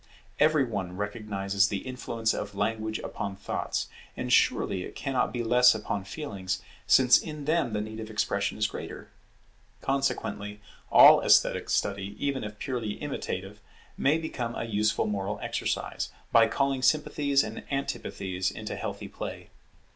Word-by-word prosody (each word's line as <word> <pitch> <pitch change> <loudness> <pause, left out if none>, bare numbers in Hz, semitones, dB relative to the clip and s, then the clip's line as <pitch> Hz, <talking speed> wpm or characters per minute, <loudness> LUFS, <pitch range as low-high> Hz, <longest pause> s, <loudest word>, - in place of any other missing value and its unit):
Every 155 -1 +5
one 95 -7 -4
recognizes 100 -1 0
the 100 -1 -4
influence 115 -3 -1
of 100 -1 -5
language 110 +1 -1
upon 100 -1 -4
thoughts: 100 - -3 0.3
and - - -1
surely 95 - +3
it - - -9
cannot 135 -2 0
be 120 -1 -2
less 125 +1 +6
upon 105 -2 -3
feelings, 100 -7 -4 0.3
since 125 -2 +7
in 150 -2 -7
them 155 -7 +1
the 105 - 0
need 110 +1 -6
of 110 0 -6
expression 100 -1 -1
is 110 - +1
greater. - - -6 0.7
Consequently 105 -6 -1 0.3
all - - +9
esthetic - - +4
study, 100 0 -1
even 140 -3 -1
if 105 0 -7
purely 115 -3 -3
imitative, - - -5 0.3
may 145 +4 +3
become 125 -8 -4
a - - -3
useful 110 -1 +1
moral 100 0 -2
exercise, - - -2 0.2
by 115 -1 +6
calling 135 +3 0
sympathies 140 -1 +2
and - - -6
antipathies 95 -8 -2
into - - -6
healthy - - -5
play. - - -7
110 Hz, 145 wpm, -28 LUFS, 100-130 Hz, 0.7 s, all